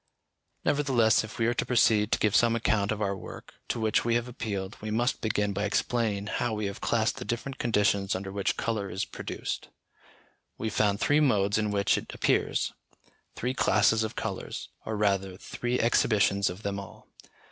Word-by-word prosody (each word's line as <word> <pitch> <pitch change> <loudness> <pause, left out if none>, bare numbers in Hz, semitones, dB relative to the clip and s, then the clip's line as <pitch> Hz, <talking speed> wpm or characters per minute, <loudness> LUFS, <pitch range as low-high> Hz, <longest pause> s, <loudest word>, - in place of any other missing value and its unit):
Nevertheless, 130 -7 +3
if 110 - -9
we 115 - +1
are 120 - +2
to - - 0
proceed 110 -3 +3
to - - +3
give 105 -2 +1
some 115 -1 +4
account 110 -3 +1
of 110 0 -1
our 100 -1 0
work, 95 - -10
to 120 - -2
which 110 -1 +2
we 115 0 +1
have 120 +1 0
appealed, 105 -5 -4
we 110 - -4
must 120 +4 0
begin 105 -2 0
by 100 +2 -2
explaining 105 -1 0
how 110 +1 -1
we 105 -1 -2
have 100 +1 -5
classed 115 +1 +1
the 125 - -5
different 130 +3 -4
conditions 100 -4 +2
under 95 +1 -5
which 100 0 -1
colour 110 -4 -2
is 95 - -2
produced. - - -5 0.9
We 110 0 -3
found 100 -1 +1
three 145 +5 +3
modes 105 -7 +3
in 105 -1 0
which 100 -1 +2
it - - -10
appears; - - +1 0.6
three 125 +2 -2
classes 110 -2 +3
of 110 - -4
colours, - - -5 0.2
or 110 - -2
rather 100 -2 0
three 120 +4 -3
exhibitions 100 -4 +3
of 90 +4 -8
them 100 0 -2
all. 100 - -11
110 Hz, 185 wpm, -28 LUFS, 100-115 Hz, 0.9 s, some